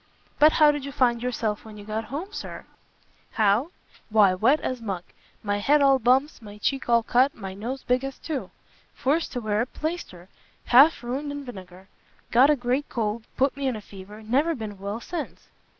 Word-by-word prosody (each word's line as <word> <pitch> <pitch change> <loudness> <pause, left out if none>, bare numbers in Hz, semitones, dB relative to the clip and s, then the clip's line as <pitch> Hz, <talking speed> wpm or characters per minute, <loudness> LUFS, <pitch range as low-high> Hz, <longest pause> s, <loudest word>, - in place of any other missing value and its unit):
"But 305 +1 +7
how 300 -2 +6
did 290 -2 -4
you 280 - -6
find 240 -3 +2
yourself 230 -4 -2
when 215 -1 -11
you 205 - -10
got 215 +1 -3
home, 330 - -6
Sir?" - - -7 0.7
"How? 220 +7 +2 0.4
why 210 -3 +5
wet 235 +11 +3
as 255 -2 -3
muck; 195 -5 -4 0.4
my 205 -1 -1
head 290 +8 +3
all 275 -1 +4
bumps, 260 +5 +2
my 210 -1 -11
cheek 265 +4 -2
all 235 -1 +4
cut, 255 +4 +2
my 195 -3 -7
nose 240 +7 -5
big 250 +1 +1
as 270 -1 -5
two! 305 -5 -5 0.5
forced 300 +5 0
to 245 - -3
wear 215 -1 0
a 240 - -1
plaister; 305 - -6 0.4
half 275 +3 +6
ruined 270 +5 -3
in 285 -1 -6
vinegar. 190 -5 -11 0.4
Got 255 +4 +6
a 300 - +5
great 255 +2 -1
cold; 220 -1 -2
put 270 +1 +2
me 275 -1 -2
in 255 - -1
a - - -5
fever; 205 +2 -12
never 280 +9 +1
been 215 -5 -7
well 200 +3 -4
since." 325 +4 -7
245 Hz, 195 wpm, -25 LUFS, 210-275 Hz, 0.7 s, But